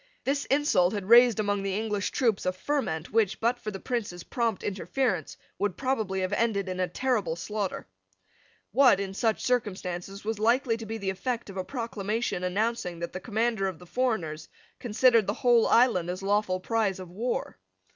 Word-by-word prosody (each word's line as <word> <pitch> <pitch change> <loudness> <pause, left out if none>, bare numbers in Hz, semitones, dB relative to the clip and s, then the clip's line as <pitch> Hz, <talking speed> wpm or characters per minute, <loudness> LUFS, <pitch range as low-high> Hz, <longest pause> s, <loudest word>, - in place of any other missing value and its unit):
This 280 +1 0
insult 260 -10 +3
had 200 -1 -5
raised 240 -1 +7
among 205 -1 0
the 195 0 -2
English 210 -2 -1
troops 225 -7 0
a - - +3
ferment 185 - -2
which, 215 -4 +2
but 240 +2 +1
for 215 - -5
the 195 -2 -6
Prince's 205 -8 -3
prompt 230 -5 -1
interference, 200 - -2 0.2
would 205 -3 -1
probably 220 -8 -1
have 185 +2 -1
ended 205 -3 +1
in 185 0 -4
a 185 - +1
terrible 210 -5 -1
slaughter. 200 +2 -4 0.9
What, 255 -2 +5
in 195 -1 -3
such 220 +2 0
circumstances, 195 -5 -2
was 220 -1 -2
likely 235 +2 +2
to 225 -1 -8
be 225 +1 -4
the 195 -3 -2
effect 235 +2 -3
of 195 - -10
a 185 - -1
proclamation 225 -4 -3
announcing 185 -1 -1
that 170 0 -5
the 185 - -4
commander 220 -1 0
of 185 -3 -4
the 180 - -14
foreigners 175 -9 -2 0.3
considered 230 -1 +3
the 205 - 0
whole 240 -2 +4
island 225 -8 +4
as 185 +2 -4
lawful 200 -2 +1
prize 205 -1 0
of 180 -2 -9
war? 230 +7 -3
210 Hz, 180 wpm, -28 LUFS, 185-235 Hz, 0.9 s, raised